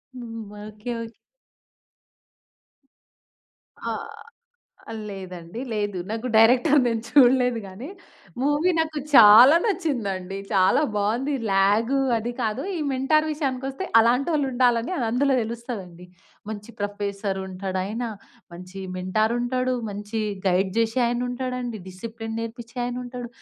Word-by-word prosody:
హ్మ్. 230 -3 -7 0.2
Okay. 215 +3 -7
Okay. 230 0 -8 2.6
ఆ! - - -4 1.2
లేదండి. 185 +1 -8
లేదు 205 -3 -2
నాకు 225 +3 -3
డైరెక్టర్ 250 +6 +5
నేను 230 -2 0
చూడలేదు 250 -3 +5
గాని 205 - -9 0.5
మూవీ 295 +5 +2
నాకు 315 -1 0 0.2
చాలా 235 +7 +9
నచ్చిందండి. 225 - -2
చాలా 190 +9 +4
బావుంది. 235 +8 0 0.2
ల్యాగ్ 200 +5 +3 0.3
అది 240 +2 -4
కాదు 220 +5 -1
ఈ - - -3
మెంటార్ 305 +4 +2
విషయానికొస్తే 270 +2 -3 0.2
అలాంటోళ్ళుండాలని 250 0 +2 0.2
అందులో 270 +3 +2
తెలుస్తదండి. 220 -7 -7 0.4
మంచి 210 +2 -7
ప్రొఫెసర్ 200 -1 -3
ఉంటాడాయన, 190 +4 -3 0.5
మంచి 185 +2 -9 0.2
మెంటార్ 215 +5 0
ఉంటాడు, 255 +1 0 0.2
మంచి 205 +2 -4 0.3
గైడ్ 190 +1 +2
జేసే 230 +3 +1
ఆయన 240 +1 -1
ఉంటాడండి, 250 -3 -4
డిసిప్లిన్ 225 +4 -7
నేర్పించే 230 +2 -8
ఆయన 245 0 -3
ఉంటాడు. 245 -1 -7
230 Hz, 105 wpm, -24 LUFS, 205-255 Hz, 2.6 s, చాలా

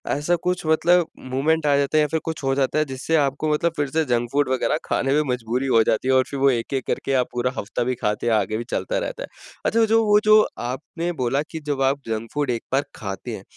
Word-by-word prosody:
ऐसा 150 +5 +1
कुछ 180 -1 -1
मतलब 170 +2 +3 0.2
मूवमेंट 150 +4 +1
आ 145 - +4
जाता 140 +2 +1
है - - +5
या 150 - +2
फिर 160 - +1
कुछ 160 -2 -4
हो 135 0 +1
जाता 140 +2 +1
है। 155 - +2
जिससे 135 +4 -2
आपको 145 0 +1
मतलब 170 +3 +1
फिर 145 -1 0
से 160 +3 +1
जंक 120 -2 0
फूड 145 -1 +2
वगैरह 130 +3 +1
खाने 135 - 0
में 150 - +3
मजबूरी 125 +2 -2
हो 115 -3 +4
जाती 110 +3 0
है 130 - +3
और 130 0 +5
फिर 140 - -4
वो 135 +1 +5
एक-एक 130 +1 -1
करके 135 - -1
आप 125 - -3
पूरा 125 +1 0
हफ्ता 115 +4 -2
भी 125 +1 -1
खाते 105 +2 -1
हैं, 115 - +3
आगे 110 0 +1
भी 115 - -4
चलता - - -2
रहता - - -4
है। - - -7 0.4
अच्छा 225 0 +3
जो 225 +1 +3
वो 210 0 +5
जो 215 0 +7 0.2
आपने 155 +8 -4
बोला 135 +4 +1
कि 160 - -5
जब 145 -2 -2
आप 135 +1 +2
जंक 115 0 -3
फूड 145 -2 -1
एक 115 - -3
बार 135 +2 +3
खाते 100 -3 -6
हैं। - - -13
140 Hz, 255 wpm, -22 LUFS, 125-160 Hz, 0.4 s, जो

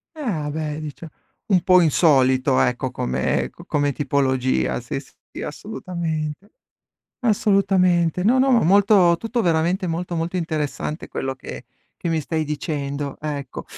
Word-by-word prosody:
Ah 185 - -3
beh, 155 0 -3
dice 155 +2 -8 0.4
un 190 -4 +3
po' 185 -1 +6
insolito 130 -5 +3
ecco, 125 +1 0
come 65 - -1
co - - -15
come 145 -1 0
tipologia, 130 - 0
sì, - - -4
sì, - - -13
assolutamente, 165 +1 -5 0.7
assolutamente. 190 -6 +2
No, 250 +4 +4
no, 270 +1 +4
ma 240 -3 +4
molto 190 -1 +5
tutto 230 +1 -2
veramente 175 +1 +1
molto, 175 +1 -3
molto 165 +3 -2
interessante 155 -2 -3
quello 135 0 -3
che - - -9 0.3
che 170 - -3
mi 160 -1 +1
stai 160 +1 -2
dicendo, 145 -2 -3
ecco. 145 -3 -5
160 Hz, 135 wpm, -22 LUFS, 140-185 Hz, 0.7 s, po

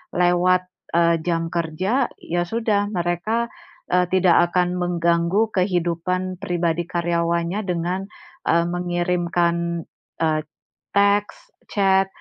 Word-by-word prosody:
lewat, 180 +1 +3 0.3
eee, 170 0 +4
jam 165 -1 0
kerja, 185 - 0
ya 175 +1 -1
sudah 215 -1 0
mereka, 185 +6 -1 0.4
eee, 180 0 +3
tidak 180 -2 +4
akan 180 0 +1
mengganggu 175 +4 +1
kehidupan 180 0 -1
pribadi 175 -3 -1
karyawannya 170 +1 0
dengan, 180 +2 -2 0.4
eee, 170 0 +4
mengirimkan, 175 -1 0 0.4
eee, 155 -1 +2 0.5
teks, 205 - +1 0.2
chat, 195 -2 +3
175 Hz, 100 wpm, -22 LUFS, 170-190 Hz, 0.5 s, eee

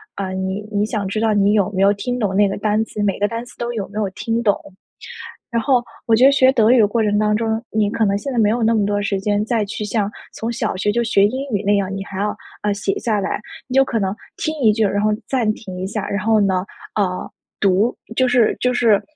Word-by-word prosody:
呃， 190 -1 -3
你 190 +2 -3
你 205 0 +1
想 215 -2 -3
知 200 +3 -2
道 220 -1 +2
你 205 0 +3
有 205 -3 +2
没 190 - 0
有 200 +1 +6
听 245 +5 -3
懂 205 -4 0
那 205 0 +4
个 195 - -2
单 210 +1 +1
词， 210 - -6
每 200 -1 0
个 205 - +2
单 230 +2 -4
词 245 - -16
都 240 0 -3
有 205 -4 -3
没 210 +2 -5
有 200 -3 0
听 230 +4 -2
懂。 205 -3 +3 1.0
然 230 -1 0
后 250 0 +2 0.2
我 230 - +4
觉 245 +4 +5
得 275 - +8
学 265 -1 +5
德 230 -4 +3
语 255 - +6
的 215 - +6
过 225 +2 0
程 210 -1 +1
当 210 0 +2
中， 220 0 -1
你 210 -1 +1
可 225 +1 +1
能 200 -1 +1
现 275 +7 -4
在 245 - -2
没 215 -2 +4
有 230 +2 0
那 225 +1 +3
么 205 -2 +2
多 205 0 0
时 200 -1 -1
间 205 +1 0
再 225 -1 0
去 210 +1 -5
像 205 -1 0 0.2
从 225 - -4
小 225 - -2
学 205 +2 0
就 235 +2 +1
学 210 -3 +3
英 260 +6 -2
语 205 0 -1
那 205 - +4
样， 195 -1 0
你 195 0 -4
还 195 -1 -6
要， 210 +1 -1 0.3
呃， 210 -1 +1
写 200 -1 -2
下 220 -3 0
来。 - - -2 0.3
你 255 - -6
就 270 0 +6
可 235 -4 -1
能 195 -1 -1 0.2
听 310 0 -2
一 220 -4 +5
句 220 0 +1
儿， 200 - +1
然 205 - +1
后 215 - +3 0.2
暂 235 -5 +1
停 190 -5 -9
一 185 - -3
下。 210 0 -3
然 200 0 -2
后 220 -1 +3
呢， 190 -2 +1 0.3
呃， 185 -3 -1 0.3
读 200 +4 +2 0.2
就 255 +1 +2
是 245 -2 +3
就 250 0 +2
是， 230 -4 +3
210 Hz, 290 characters per minute, -20 LUFS, 200-230 Hz, 1.0 s, 得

